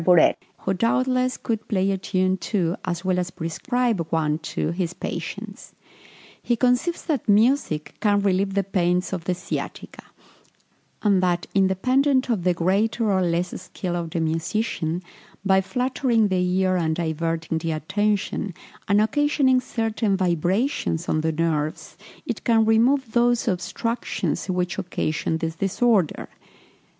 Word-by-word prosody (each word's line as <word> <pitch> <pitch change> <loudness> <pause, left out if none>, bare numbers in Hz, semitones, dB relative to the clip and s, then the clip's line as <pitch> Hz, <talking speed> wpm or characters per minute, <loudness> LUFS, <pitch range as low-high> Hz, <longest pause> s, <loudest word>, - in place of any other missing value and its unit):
Burette, 175 -1 +5 0.2
who 190 - 0
doubtless 255 +5 +1
could 225 -2 -3
play 195 -2 +1
a 195 - 0
tune 185 0 +1
to, 180 -3 -1
as 175 0 -3
well 185 -1 +2
as 180 0 -2
prescribe 210 +3 -1
one 155 -1 0
to, 160 0 -3
his 175 0 -3
patient. - - -6 0.7
He 240 - +1
conceives 250 +8 +1
that 290 -10 -1
music 210 - +2
can 205 -2 +3
relieve 195 0 +1
the 200 - +2
pains 180 -1 0
of 175 -3 -4
the 180 - 0
sciatica; 180 +2 -6 1.0
and 200 -3 +3
that, 175 -1 +1
independent 255 +8 +2
of 205 -7 0
the 180 0 +2
greater 205 +6 +1
or 190 -1 +2
less 175 0 -1
skill 180 -2 -4
of 170 -1 -3
the 170 +1 -2
musician, 165 +1 -1 0.4
by 190 0 +4
flattering 240 +1 +1
the 185 -1 +1
ear, 185 0 +2
and 160 -2 0
diverting 165 0 -2
the 165 0 -2
attention, 200 +3 -1 0.3
and 200 +1 +4
occasioning 265 +2 +3
certain 220 -4 -1
vibrations 180 - 0
of 155 - +1
the 160 +1 0
nerves, 155 -1 -2 0.3
it - - -4
can 225 -2 +4
remove 235 +3 +3
those 240 0 +2
obstructions 230 +2 -2
which 180 0 -1
occasion 160 -3 -2
this 160 0 -4
disorder. 195 -1 +1
190 Hz, 140 wpm, -23 LUFS, 170-225 Hz, 1.0 s, Burette